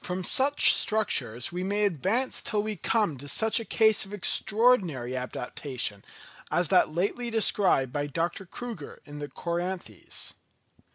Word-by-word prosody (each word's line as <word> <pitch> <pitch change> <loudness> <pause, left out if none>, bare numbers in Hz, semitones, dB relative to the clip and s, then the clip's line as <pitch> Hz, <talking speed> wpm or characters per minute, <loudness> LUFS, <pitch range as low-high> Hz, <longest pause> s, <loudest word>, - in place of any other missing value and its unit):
From 180 +1 -3
such 280 +9 +5
structures 175 - 0
we 180 +1 -4
may 205 +2 0
advance 200 - -1
till 210 -2 -1
we 215 0 -4
come 195 - 0
to 145 +2 -9
such 220 - +3
a - - -5
case 220 0 +3
of 200 +1 -7
extraordinary 190 - +2
adaptation 125 -4 -4 0.5
as 175 -1 0
that 185 - +4
lately 200 +9 -2
described 200 - +2
by 145 0 -2
Dr. 170 +5 -3
Crüger 225 -8 -8
in 145 0 -9
the 145 - -5
Coryanthes. 175 - -4
185 Hz, 145 wpm, -27 LUFS, 145-215 Hz, 0.5 s, such